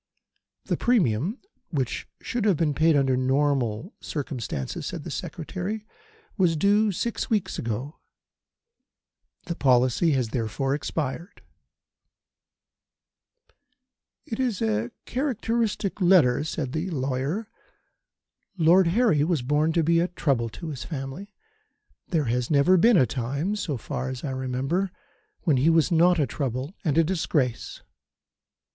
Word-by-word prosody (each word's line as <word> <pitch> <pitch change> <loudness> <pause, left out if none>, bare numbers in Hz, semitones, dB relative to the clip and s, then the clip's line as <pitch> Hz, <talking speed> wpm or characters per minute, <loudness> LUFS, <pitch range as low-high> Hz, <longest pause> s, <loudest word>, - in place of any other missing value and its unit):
"The - - -1
premium 185 - +1 0.3
which 135 -7 -2 0.2
should 240 -2 -2
have 195 -6 +3
been 155 -2 +1
paid 160 +2 +3
under 135 -2 +3
ordinary 130 - 0
circumstances," 125 - -4
said - - -5
the - - -7
Secretary, 190 +6 -5 0.5
"was 175 -3 +3
due 205 +5 +3
six 235 +7 -3
weeks 215 -5 0
ago. 120 +7 -4 1.5
The 170 - -2
policy 130 +3 +3
has 125 -4 0
therefore 125 +4 -1
expired." 150 - -4 2.8
"It 225 - -5
is 245 -7 0
a 110 +1 0 0.2
characteristic 230 -6 -1
letter," 170 -8 +5
said 150 -5 -3
the 160 +6 -2
lawyer. 140 - -2 1.1
"Lord 175 +2 +5
Harry 175 -5 +3
was 160 -5 0
born 150 +4 +2
to 165 -1 +2
be 165 +2 +3
a 175 - +2
trouble 135 -10 0
to 165 +8 -7
his 135 -8 -5
family. 135 - -6 0.8
There 160 -6 0
has 120 +1 -1
never 150 +5 +5
been 215 +4 +5
a 130 - +5
time, 140 - -2
so 165 -9 -3
far 125 +3 -4
as 130 -2 -6
I 140 - -2
remember, 130 +9 -1 0.5
when 155 -7 +2
he 140 +6 +3
was 165 -1 +3
not 175 +2 +5
a 150 - +2
trouble 135 +2 -3
and 155 -4 0
a 165 - +6
disgrace. 150 -8 -1
155 Hz, 130 wpm, -25 LUFS, 130-185 Hz, 2.8 s, a